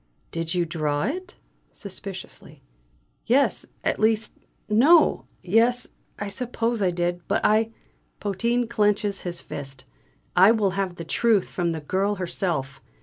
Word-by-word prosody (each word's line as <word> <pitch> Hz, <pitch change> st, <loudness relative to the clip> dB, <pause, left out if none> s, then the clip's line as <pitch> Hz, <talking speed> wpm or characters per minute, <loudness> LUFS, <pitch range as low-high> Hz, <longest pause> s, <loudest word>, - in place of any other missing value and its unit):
"Did 165 Hz, +1 st, -2 dB
you 175 Hz, -1 st, +2 dB
draw 155 Hz, -3 st, -1 dB
it?" 365 Hz, +5 st, -4 dB, 0.4 s
suspiciously. 195 Hz, -1 st, -9 dB, 0.6 s
"Yes. 270 Hz, +4 st, +2 dB, 0.2 s
At -, -, 0 dB
least, 220 Hz, 0 st, +2 dB, 0.3 s
no! 270 Hz, +11 st, +5 dB, 0.2 s
Yes, 230 Hz, +6 st, +2 dB, 0.3 s
I 205 Hz, -, -4 dB
suppose 230 Hz, +1 st, -2 dB
I 190 Hz, -, +3 dB
did. 175 Hz, 0 st, -1 dB
But -, -, 0 dB
I 220 Hz, +1 st, +3 dB, 0.3 s
" -, -, -42 dB
Potin 235 Hz, +4 st, 0 dB
clenches 210 Hz, -3 st, +1 dB
his 175 Hz, -1 st, -4 dB
fist: 135 Hz, -2 st, -8 dB, 0.5 s
"I 190 Hz, +5 st, +7 dB
will 210 Hz, -4 st, +1 dB
have 190 Hz, -2 st, -2 dB
the 170 Hz, -, -7 dB
truth 220 Hz, +2 st, +2 dB
from 175 Hz, -2 st, -1 dB
the 160 Hz, -1 st, -4 dB
girl 195 Hz, +7 st, 0 dB
herself! 170 Hz, -7 st, -2 dB
200 Hz, 140 wpm, -25 LUFS, 175-225 Hz, 0.6 s, I